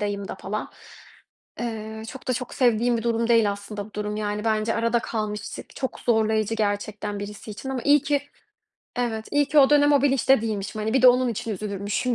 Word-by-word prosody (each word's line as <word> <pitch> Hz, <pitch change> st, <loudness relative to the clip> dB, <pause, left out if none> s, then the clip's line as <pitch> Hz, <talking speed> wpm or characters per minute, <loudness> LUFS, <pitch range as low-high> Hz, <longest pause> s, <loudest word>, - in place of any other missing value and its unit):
dayımda 205 Hz, -1 st, -3 dB
falan. 200 Hz, +2 st, -5 dB, 0.9 s
Eee, 220 Hz, -2 st, -5 dB
çok 265 Hz, +1 st, -9 dB
da -, -, +3 dB
çok 250 Hz, 0 st, -4 dB
sevdiğim 240 Hz, -1 st, +3 dB
bir 225 Hz, -, -3 dB
durum 230 Hz, 0 st, 0 dB
değil 230 Hz, -3 st, +4 dB
aslında 200 Hz, 0 st, -7 dB
bu 215 Hz, -, -19 dB
durum 210 Hz, 0 st, -3 dB
yani 210 Hz, 0 st, -2 dB
bence 220 Hz, 0 st, +1 dB
arada 230 Hz, +1 st, +2 dB
kalmışlık 215 Hz, -2 st, -5 dB
çok 260 Hz, -2 st, -4 dB
zorlayıcı 220 Hz, -1 st, +1 dB
gerçekten 205 Hz, -1 st, -2 dB
birisi 205 Hz, +1 st, -7 dB
için 210 Hz, +6 st, -7 dB
ama 260 Hz, -2 st, -3 dB
iyi 290 Hz, -1 st, +5 dB
ki 285 Hz, -2 st, +1 dB, 0.7 s
Evet, 225 Hz, -3 st, -2 dB
iyi 290 Hz, 0 st, +3 dB
ki 305 Hz, -, +3 dB
o 270 Hz, -1 st, +7 dB
dönem 290 Hz, 0 st, +5 dB
o 280 Hz, -2 st, +4 dB
bilinçte 270 Hz, -2 st, +4 dB
değilmişim. 215 Hz, -1 st, -3 dB
Hani, 215 Hz, +1 st, -1 dB
bir 265 Hz, -, +3 dB
de 255 Hz, -, +10 dB
onun 250 Hz, 0 st, +4 dB
için 230 Hz, 0 st, -3 dB
üzülürmüşüm 205 Hz, +4 st, -2 dB
220 Hz, 195 wpm, -24 LUFS, 210-245 Hz, 0.9 s, de